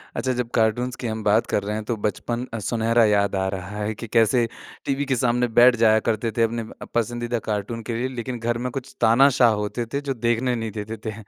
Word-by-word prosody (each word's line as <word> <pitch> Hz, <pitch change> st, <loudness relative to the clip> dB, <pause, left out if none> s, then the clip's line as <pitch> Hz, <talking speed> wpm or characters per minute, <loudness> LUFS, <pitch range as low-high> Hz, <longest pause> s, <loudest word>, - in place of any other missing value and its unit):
अच्छा, 130 Hz, -, -1 dB
जब 125 Hz, -1 st, -2 dB
कार्टून्स 120 Hz, +3 st, +1 dB
की 120 Hz, -, -2 dB
हम 110 Hz, -1 st, -4 dB
बात 105 Hz, +2 st, +3 dB
कर 100 Hz, -, 0 dB
रहे 105 Hz, +1 st, -3 dB
हैं, 110 Hz, -, -3 dB
तो 115 Hz, -, -1 dB
बचपन 120 Hz, +4 st, -2 dB
अ, 115 Hz, -, -3 dB
सुनहरा 115 Hz, +2 st, +2 dB
याद 100 Hz, -2 st, +2 dB
आ 95 Hz, 0 st, 0 dB
रहा 100 Hz, +2 st, -6 dB
है 110 Hz, +1 st, -1 dB
कि 115 Hz, -, -7 dB
कैसे 115 Hz, +2 st, +3 dB, 0.4 s
टीवी 140 Hz, +1 st, -1 dB
के 135 Hz, -1 st, 0 dB
सामने 125 Hz, 0 st, +1 dB
बैठ 125 Hz, 0 st, +7 dB
जाया 110 Hz, -1 st, +4 dB
करते 110 Hz, +1 st, -1 dB
थे, 115 Hz, -, +4 dB
अपने 115 Hz, 0 st, -1 dB
म 110 Hz, -, -11 dB
अ, -, -, -6 dB
पसंदीदा 120 Hz, 0 st, -1 dB
कार्टून 110 Hz, +2 st, -2 dB
के 115 Hz, -, -4 dB
लिए। 125 Hz, +2 st, -1 dB
लेकिन 120 Hz, +1 st, -4 dB
घर 115 Hz, +1 st, -1 dB
में 125 Hz, -, -2 dB
कुछ 135 Hz, 0 st, -7 dB
तानाशाह 120 Hz, +1 st, +5 dB
होते 115 Hz, +3 st, -3 dB
थे, 140 Hz, -, 0 dB
जो 140 Hz, -1 st, -2 dB
देखने 120 Hz, +1 st, 0 dB
नहीं 115 Hz, -2 st, -4 dB
देते 110 Hz, +2 st, -5 dB
थे, 110 Hz, -, -2 dB
115 Hz, 240 wpm, -23 LUFS, 110-120 Hz, 0.4 s, बैठ